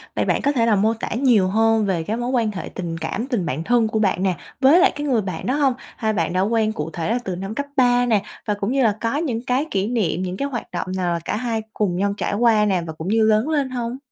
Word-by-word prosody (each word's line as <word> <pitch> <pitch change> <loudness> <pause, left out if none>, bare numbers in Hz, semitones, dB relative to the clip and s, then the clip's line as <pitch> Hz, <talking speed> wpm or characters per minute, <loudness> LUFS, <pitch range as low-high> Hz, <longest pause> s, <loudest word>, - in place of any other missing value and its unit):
vậy - - 0
bạn - - +1
có 285 - +2
thể 235 -5 +1
là 225 - +3
mô 215 +3 +2
tả 225 - -5
nhiều 235 -7 +3
hơn 225 +2 +2
về 180 -5 0
cái 220 +6 -2
mối 240 +1 -2
quan 230 -4 +1
hệ 190 - -6
tình 170 -3 -5
cảm, 225 +8 -3
tình 235 -10 -1
bạn 145 +4 -3
thân 235 +2 +2
của 220 0 -1
bạn 195 -3 +1
nè, 185 -2 +1 0.3
với 280 +7 +6
lại 380 +1 +5
cái 295 0 -3
người 245 -5 +2
bạn 185 -5 -5
đó 255 - 0
hông? 280 -3 +2 0.2
Hai 220 -2 0
bạn 190 - -1
đã 185 - +1
quen 220 +1 +1
cụ 150 -3 -4
thể 165 +3 -3
là 240 - +1
từ 185 - -3
năm 195 +4 -5
cấp 285 +2 -2
ba 245 -2 +4
nè, 220 -4 +2 0.2
và 210 - 0
cũng 200 +2 -2
như 270 0 +2
là 215 -3 +2
có 230 +5 0
những 255 -8 -2
cái 260 +4 +1
kỷ 195 +1 0
niệm, 220 -7 0
những 185 +1 -4
cái 280 - -1
hoạt 245 -4 -6
động - - -3
nào 175 -2 0
là 170 - -1
cả - - -1
hai 230 -2 -2
cùng 195 -5 0
nhau 200 +2 0
trải - - -2
qua 220 -1 +3
nè 190 -4 +1
và 160 - -5
cũng 160 +2 -7
như 220 +2 +3
lớn 220 +6 +2
lên 290 -4 0
hông? 245 -1 -4
220 Hz, 295 wpm, -21 LUFS, 195-245 Hz, 0.3 s, với